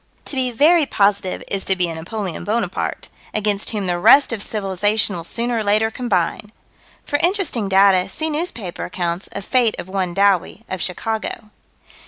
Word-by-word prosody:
To - - -2
be 260 -1 +1
very 300 +6 +4
positive 200 -4 +1
is 195 -1 -2
to 190 - +2
be 180 -1 +1
a 165 - -4
Napoleon 180 +3 -5
Bonaparte, 225 +3 -2 0.3
against 210 -1 0
whom 210 -3 -2
the 175 -1 -1
rest 275 +7 +6
of 220 - -4
civilization 205 0 0
will 170 - -5
sooner 235 +6 -1
or - - -1
later 215 +2 +2
combine. 210 -4 -1 0.5
For 290 - 0
interesting 345 - 0
data, 190 -1 +4
see 315 +10 -3
newspaper 295 - -4
accounts 175 0 -3
of 200 - -6
fate 245 -4 +2
of - - -6
one 185 -2 -2
Dowie, 200 +2 +2
of 185 - -4
Chicago. 220 +2 -3
205 Hz, 170 wpm, -20 LUFS, 185-230 Hz, 0.5 s, rest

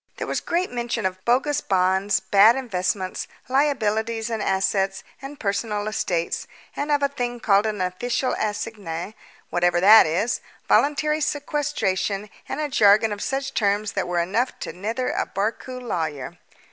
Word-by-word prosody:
There - - -3
was - - -1
great 350 +2 -1
mention 240 -3 -2
of 185 0 -3
bogus 270 +5 +2
bonds, 190 +1 +2
bad 205 +4 +5
investments, 190 -6 -2 0.2
liabilities 230 -5 0
and 220 -2 -2
assets 195 0 0 0.2
and 275 +1 -9
personal 210 0 -2
estates, 175 -5 -2 0.3
and 290 +1 -2
of 290 -1 +2
a - - +5
thing 245 -3 -4
called 205 -1 +3
an 210 -3 -3
official 235 +8 -1
assignee 205 -4 -4 0.4
whatever 175 0 +2
that 210 +2 +8
is 185 +10 0 0.3
voluntary 300 +2 +2
sequestration, 225 -10 -1 0.2
and 270 - -3
a 305 - 0
jargon 215 -4 +4
of 205 0 -4
such 270 0 -2
terms 205 0 +1
that 190 -3 -2
were 175 0 -2
enough 205 +9 0
to - - -5
mither 225 +7 -2
a - - -1
Barcoo 225 +6 -3
lawyer. 160 - -4
215 Hz, 150 wpm, -23 LUFS, 195-255 Hz, 0.4 s, that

